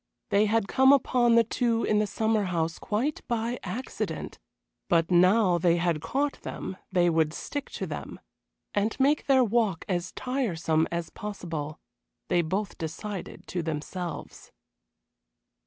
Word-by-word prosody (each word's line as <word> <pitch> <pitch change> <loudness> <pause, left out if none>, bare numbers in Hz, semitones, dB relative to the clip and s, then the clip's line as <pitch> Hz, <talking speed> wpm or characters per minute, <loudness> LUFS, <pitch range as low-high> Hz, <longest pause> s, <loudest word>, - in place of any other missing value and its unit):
They 210 +2 +4
had 220 -1 +1
come 265 +5 +5
upon 245 -4 +4
the 230 - +6
two 230 0 0
in 210 - +2
the 210 - +1
summer 220 +1 +1
house 165 -3 -1
quite 245 +9 -1
by 235 +1 -1
accident, 225 +8 -5 0.5
but 165 0 +3
now 180 +1 +5
they 170 0 +3
had 170 -3 0
caught 275 - -1
them 185 - -6
they 175 -2 +3
would 160 -2 +2
stick 285 -1 -5
to 190 - -3
them, 155 - -6 0.5
and 210 +5 0
make 285 +3 +3
their 265 -2 +5
walk 220 -6 +1
as 180 -2 -1
tiresome 170 -12 0
as 170 -1 -3
possible, 165 -8 -5 0.5
they 175 - +3
both 190 +5 -3
decided 185 +4 -6
to 180 - -2
themselves. 165 +3 -5
195 Hz, 140 wpm, -27 LUFS, 170-230 Hz, 0.5 s, the